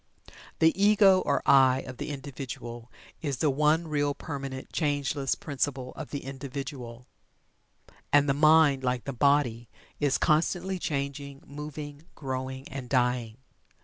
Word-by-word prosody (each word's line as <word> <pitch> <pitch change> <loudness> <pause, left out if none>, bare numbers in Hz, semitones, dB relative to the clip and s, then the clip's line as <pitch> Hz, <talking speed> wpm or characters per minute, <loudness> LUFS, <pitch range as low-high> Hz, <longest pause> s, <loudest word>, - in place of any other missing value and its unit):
The 160 0 +4
Ego 200 -2 +6
or 145 - +1
"I" 130 -1 +5
of 130 -1 -9
the - - -5
individual 130 -4 -7 0.3
is 140 -5 -2
the 150 +2 +2
one 155 +4 +2
real, 145 -2 0
permanent, 135 -4 -6
changeless 145 -3 0
principle 140 -6 -3
of 155 - -7
the 145 - -5
individual, 135 -3 -7 1.1
and 145 0 +5
the 140 - +3
mind, 155 -2 +5
like 125 -1 -1
the 140 - -5
body, 125 -3 +2 0.3
is 145 -2 +2
constantly 180 +4 +1
changing, 140 -2 -4
moving, 150 +1 -8
growing, 130 -1 -5
and 130 -2 -7
dying. 125 -3 0
140 Hz, 130 wpm, -28 LUFS, 130-150 Hz, 1.1 s, Ego